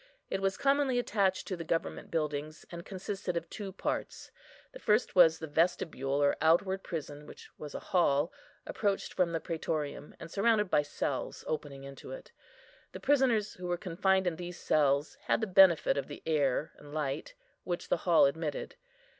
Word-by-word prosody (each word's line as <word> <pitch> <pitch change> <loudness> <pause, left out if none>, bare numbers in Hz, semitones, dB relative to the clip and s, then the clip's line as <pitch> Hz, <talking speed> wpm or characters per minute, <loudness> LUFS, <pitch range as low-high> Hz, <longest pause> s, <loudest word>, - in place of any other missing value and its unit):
It 195 - -1
was 195 -1 0
commonly 275 -2 +2
attached 200 -6 +1
to 190 - -3
the 170 - -6
government 165 0 -2
buildings, 155 -1 -3
and 170 -1 -7
consisted 190 -2 -4
of 170 0 -4
two 200 -2 -5
parts. 190 - -4 0.4
The - - -11
first 215 - +2
was 165 -3 +7
the 160 - -6
vestibule, 145 -3 0
or 140 - +3
outward 190 +5 +3
prison, 150 -2 -6
which - - -13
was 150 -1 -7
a - - -3
hall, 155 -3 +3 0.3
approached 200 -2 -1
from 180 -2 +1
the 165 - -1
prætorium, 155 -3 -4
and 165 - -9
surrounded 210 -2 +2
by - - +5
cells, 145 -2 -3
opening 145 -3 -4
into 135 0 -10
it. - - -9 0.6
The - - -6
prisoners, 255 -7 +2
who 180 0 -7
were 175 0 0
confined 190 +1 +1
in 170 -3 -1
these 175 0 -6
cells, 145 0 +1
had - - +2
the 220 - 0
benefit 185 -7 +5
of 140 - -2
the 145 - -9
air 150 -2 +1
and 145 +1 -11
light, 150 - -3 0.3
which 175 0 -4
the - - +3
hall 170 -3 +5
admitted. 150 - -2
170 Hz, 175 wpm, -31 LUFS, 150-195 Hz, 0.6 s, was